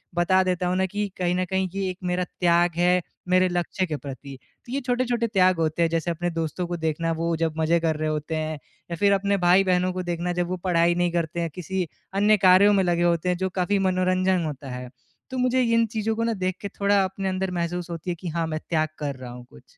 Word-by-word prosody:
बता 185 +2 +3
देता 180 -1 -1
हूँ 180 - 0
न - - +3
कि 205 0 -1
कहीं 180 -1 0
न 185 0 0
कहीं 190 +1 -1
ये 195 -1 -1
एक 180 - -5
मेरा 180 0 0
त्याग 175 -1 +2
है 180 +1 +3 0.3
मेरे 185 0 +4
लक्ष्य 175 +1 -1
के 160 -4 -3
प्रति। 140 -1 -9 0.3
तो 240 - -10
ये 275 - 0
छोटे-छोटे 245 -1 0
त्याग 185 -4 +3
होते 160 +1 0
हैं 165 - +3
जैसे 165 +1 -1
अपने 175 +1 -2
दोस्तों 165 +2 -3
को 175 0 -3
देखना 165 0 -1
वो 165 0 0
जब 165 -1 0
मज़े 160 +1 +2
कर 165 -1 0
रहे 155 0 -1
होते 155 +1 -3
हैं 155 0 -2 0.4
या - - -1
फ़िर 200 +4 +3
अपने 200 0 +1
भाई-बहनों 180 0 +3
को 185 0 -3
देखना 175 0 -2
जब 175 0 -1
वो 185 - -2
पढ़ाई 170 -2 +3
नहीं 175 0 +1
करते 170 0 -2
हैं 165 - -1
किसी 180 0 -3 0.3
अन्य 205 +2 +4
कार्यों 195 +3 +7
में 195 -1 +3
लगे 175 -1 +1
होते 170 0 +1
हैं 180 - +1
जो 190 0 -1
काफ़ी 200 +3 +1
मनोरंजन 185 -1 +1
होता 145 -3 -6
है। 125 0 -6 0.4
तो 260 - -5
मुझे 255 +1 +2
इन 230 -1 +3
चीज़ों 220 0 -2
को 230 - -1
न 230 0 +1
देख 185 0 -1
के 200 - -3
थोड़ा 200 0 +3
अपने 190 +1 -3
अंदर 190 0 -2
महसूस 175 0 -3
होती 170 +1 -5
है 175 - -1
कि, 175 +2 -8
हाँ 165 0 -1
मैं 155 -1 -3
त्याग 155 -2 +1
कर 145 -2 -3
रहा 125 -2 -9
हूँ 125 0 -10
कुछ। 65 - -16
180 Hz, 245 wpm, -24 LUFS, 165-190 Hz, 0.4 s, कार्यों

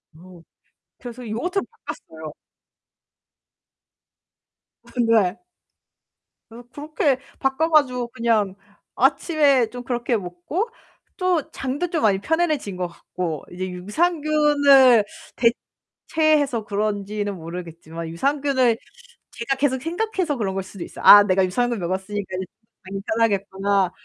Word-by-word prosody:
어 175 +1 -15 0.6
그래서 245 -1 -9
요거트로 355 - -2 0.2
바꿨어요. 160 -2 -8 2.6
근데 225 -5 +2 1.1
그래서 235 +1 -13
그렇게 295 - -1 0.2
바꿔 270 +5 +1
가지고 255 -6 +2
그냥 225 -5 0 0.4
아침에 285 -8 +3
좀 245 +1 -8
그렇게 240 -1 -1
먹고 185 - -4 0.5
또 365 -5 0
장도 275 +7 -3
좀 325 - 0
많이 200 -3 +3
편안해진 310 - 0
것 180 -1 -2
같고 170 -2 -5
이제 185 +1 -4
유산균을 285 - +4 1.1
대체해서 295 -8 +2
그런지는 205 0 -2
모르겠지만 165 -1 -8
유산균을 265 - +1 0.5
제가 235 +4 -2
계속 260 -2 0
생각해서 350 - -2
그런 195 -4 -2
걸 195 - -2
수도 190 -1 -9
있어요. - - -9
'아 205 0 +11
내가 190 -1 +2
유산균 240 +6 0
먹었으니까 190 +2 -3
이제 185 - -3 0.4
많이 195 +1 -6
편하겠구나.' 200 -3 0
230 Hz, 270 characters per minute, -22 LUFS, 190-285 Hz, 2.6 s, 아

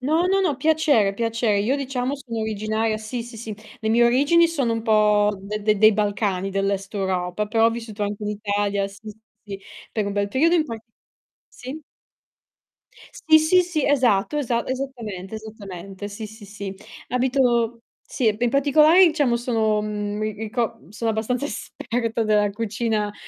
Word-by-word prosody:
No, 315 +7 +1
no, 390 +1 +2
no, 320 -8 +1
piacere, 285 -9 +2
piacer 230 -1 0
io 255 +7 +1
diciamo 270 -1 -2
sono 240 -5 -6
originaria 220 +1 -1
sì, 220 +3 -5
sì, 235 0 -11
sì. 220 -1 -6 0.2
Le 220 - -3
mie 235 +2 +4
origini 290 +8 +4
sono 275 -8 0
un 225 0 -2
po' 210 -2 +4
de 210 +2 -5
de 210 -1 +2
dei 215 +1 +7
Balcani, 200 -2 -1
dell'est 195 0 -2
Europa, 190 0 -2
però 225 +1 +3
ho - - +3
vissuto 225 -2 -6
anche 205 +1 -3
in 210 - -2
Italia 205 -1 -1
sì, 200 +2 -13
sì, 210 - -16 0.3
sì, 200 -2 -8 0.3
per 215 -2 -1
un 200 - -2
bel 200 0 0
periodo 310 +11 +3
in 320 - +2
parti 225 -4 -9 0.6
sì? 270 +5 -9 1.3
Sì, 315 -2 +4
sì, 330 +4 +4
sì, 340 -5 -1
esatto, 250 -3 +2
esa 235 -4 -1
esattamente, 235 -8 -5
esattamente, 200 -3 -8
sì, 210 +2 -7
sì, 215 0 -13
sì. 200 -1 -7 0.3
Abito 245 -2 +1 0.3
sì, 245 - +1
e 210 - 0
in 240 0 +1
particolare 305 +6 +5
diciamo 290 -7 +2
sono, 225 -3 +1
mhmm, 210 -1 -3
mi 215 0 -1
rico 225 +2 -3
sono 225 +2 -2
abbastanza 235 +5 -1
esperta 230 -4 -3
della 210 -1 +2
cucina, 215 0 -2
225 Hz, 170 wpm, -23 LUFS, 205-255 Hz, 1.3 s, dei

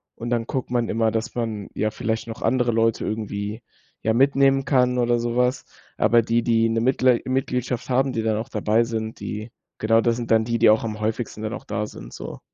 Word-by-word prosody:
Und 120 +1 -6
dann 115 -2 0
guckt 130 -1 -4
man 120 -2 +1
immer, 110 0 +1
dass 115 +3 -3
man 110 -4 -3
ja 110 0 -1
vielleicht 110 +1 -3
noch 115 - -7
andere 120 +1 +2
Leute 115 0 +1
irgendwie, 105 0 -4 0.4
ja, 110 - +1
mitnehmen 135 +2 +4
kann 125 -2 +2
oder 120 -1 +2
so 120 0 -2
was. 125 +1 +1 0.3
Aber 115 +1 +4
die 115 +1 +1
die 115 -1 +2
'ne 115 0 +1
Mitglei 125 0 +3
Mitgliedschaft 125 -1 -2
haben, 130 +1 +2
die 115 - -1
dann 110 -1 +1
auch 110 - -4
dabei 110 +2 +1
sind, 110 -1 -4
die 105 +2 -6 0.3
genau 115 +1 +3
das 115 0 +2
sind 120 -1 -5
dann 110 0 +4
die, 115 0 0
die 115 -1 +5
auch 110 +1 +3
am 110 -1 -5
häufigsten 110 0 -3
dann 110 - -3
auch - - -7
da 105 0 -2
sind - - -11
so. - - -8
115 Hz, 220 wpm, -23 LUFS, 110-125 Hz, 0.4 s, die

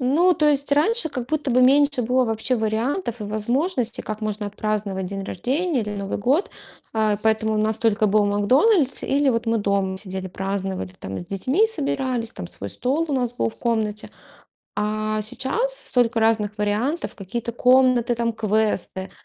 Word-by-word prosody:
Ну, 315 +9 +4
то 305 -3 +2
есть 285 -1 +1
раньше 330 +6 +2
как 245 -2 -4
будто 300 -3 -1
бы 255 +1 +4
меньше 280 0 +4
было 250 +2 +2
вообще 225 +3 -1
вариантов 230 - -1
и - - -3
возможностей, 235 - -1
как 215 0 -5
можно 210 -1 -2
отпраздновать 205 -2 -2
день 195 +1 -5
рождения 275 - -1
или 210 -1 -4
Новый 195 0 -3
год, 275 - +1 0.4
а. 215 -2 +1
Поэтому 220 0 +2
у - - 0
нас 215 0 +1
только 220 -1 +2
был 210 +1 +3
"Макдональдс" 260 - +3
или 280 0 +2
вот 230 -2 +1
мы 225 0 +2
дома 200 -2 0
сидели, 190 -1 -5
праздноватли, 190 0 -4
там, 95 0 -6
с 175 - -8
детьми 260 - +1
собирались, 265 - -2
там, 85 - -7
свой 90 +3 -7
стол 280 +7 0
у 290 - -2
нас 245 -3 0
был 230 - 0
в - - -19
комнате. 215 -3 -1 0.7
А 215 0 -1
сейчас 355 - -2
столько 245 -2 +1
разных 215 -2 +1
вариантов: 215 +11 -1
какие-то 230 +4 -5
комнаты, 250 -1 +4
там, 230 0 0
квесты, 215 -3 -1
225 Hz, 170 wpm, -23 LUFS, 210-265 Hz, 0.7 s, Ну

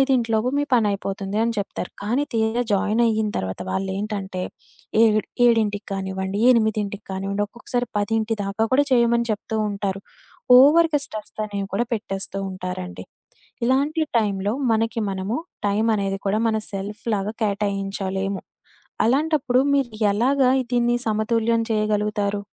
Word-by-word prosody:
5 260 -4 +2
లోపు 220 +3 +1
మీ 290 - +1
పని 230 -3 +4
అయిపోతుంది 195 0 -3
అని 230 0 +1
చెప్తారు. 200 -2 -4
కానీ, 235 +7 +1
తీరా 225 +2 +1
జాయిన్ 210 +3 +2
అయిన 220 -1 +1
తర్వాత 95 0 -4
వాళ్ళేంటంటే, 195 - -3 0.6
ఏడు 215 -1 +5 0.3
ఏడింటికి 215 -3 +2
కానివ్వండి, 190 0 -3
8కి 215 -3 0
కానివ్వండి, 195 +2 -1
ఒక్కొక్కసారి 245 +2 -3
10 220 +2 0
దాకా 200 +3 0
కూడా 285 +2 +5
చేయమని 235 -1 +3
చెప్తూ 220 +1 -2
ఉంటారు. 200 -1 -3 0.6
ఓవర్‌గా 300 +2 +6
స్ట్రెస్ 215 -1 -8
అనేవి 200 -1 -4
కూడా 240 +4 +1
పెట్టేస్తూ 195 -2 -3
ఉంటారండి. 185 0 -6 0.6
ఇలాంటి 285 +5 +2 0.2
టైంలో 205 -1 0 0.2
మనకి 225 0 0
మనము 195 +5 -2 0.3
టైమనేది 200 -2 +1
కూడా 210 +2 +1
మన 220 - +1
సెల్ఫ్‌లాగా 210 +1 -3
కేటాయించలేము. 195 -1 -2 0.6
అలాంటప్పుడు 275 +1 +2
మీరు 275 -3 +2 0.2
ఎలాగా 255 +5 +3 0.2
దీన్ని 240 0 +2
సమతుల్యం 225 +1 +1
చేయగలుగుతారు? 210 -1 0
215 Hz, 125 wpm, -23 LUFS, 195-235 Hz, 0.6 s, ఓవర్‌గా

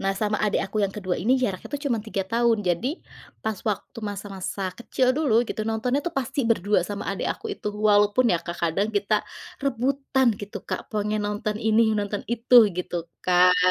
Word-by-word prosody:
nah 195 0 +1
sama 215 0 +1
adik 210 - +1
aku 195 - -7
yang 195 - -3
kedua 185 -3 -2
ini 240 +7 +3
jaraknya 195 -7 -2
tuh 285 - -3
cuman 235 -4 0
3 200 -3 -2
tahun 235 -1 +3
jadi 175 +8 +1 0.5
pas 220 -2 -2
waktu 210 +3 -4
masa-masa 195 -1 -5 0.2
kecil 245 +2 0
dulu 295 -7 +1
gitu - - -3
nontonnya 245 +5 0
tuh 345 - -1
pasti 265 +2 -2
berdua 210 -2 +3
sama 205 -1 -4
adik - - -3
aku - - -9
itu - - -10 0.2
walaupun 205 +4 +4
ya - - +3
Kak 170 0 -5
kadang 170 +5 +1
kita 205 +1 +1 0.5
rebutan 270 +1 +1
gitu 205 0 -7
Kak - - -2
pengen 210 0 0
nonton 210 +1 -2
ini 220 +1 +4 0.2
nonton 205 0 -2
itu 240 +1 +1 0.2
gitu 180 -1 -3 0.3
kan? 180 0 +5
210 Hz, 185 wpm, -25 LUFS, 200-235 Hz, 0.5 s, kan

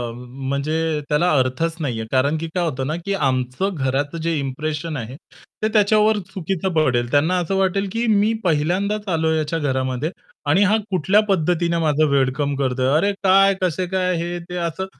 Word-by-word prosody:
म्हणजे 140 +5 -2
त्याला 170 +4 +2
अर्थच 130 +6 0
नाहीये. 115 -6 -2
कारण, 140 +4 +2
की 165 +1 -4
काय 180 - 0
होतं 135 -5 -2
ना 155 - -1
की 200 - -1
आमचं 135 +4 -1
घराचं 145 +2 -1
जे 165 0 0
इंप्रेशन 150 +3 -3
आहे 120 +1 -6 0.5
ते - - +4
त्याच्यावर 215 0 +4
चुकीचं 190 0 -2
पडेल. 125 -7 +1
त्यांना 160 +6 +2
असं 180 +2 -2
वाटेल, 195 +1 +1
की 230 +3 -1
मी 215 0 +3
पहिल्यांदाच 185 +6 0
आलोय 160 0 +1
याच्या 155 +1 -1
घरामध्ये, 130 +1 -1 0.3
आणि 165 +8 +4
हा 205 +2 +3
कुठल्या 190 +4 +3
पद्धतीने 170 -2 +1
माझं 155 -1 +2
वेलकम 140 +1 +1
करतोय. 130 -1 0
"अरे 200 +5 +2
काय? 195 +1 +5
कसे 185 0 0
काय?" 185 0 0
हे-ते 175 +1 -5
असं 170 +2 -2
160 Hz, 165 wpm, -21 LUFS, 140-185 Hz, 0.5 s, काय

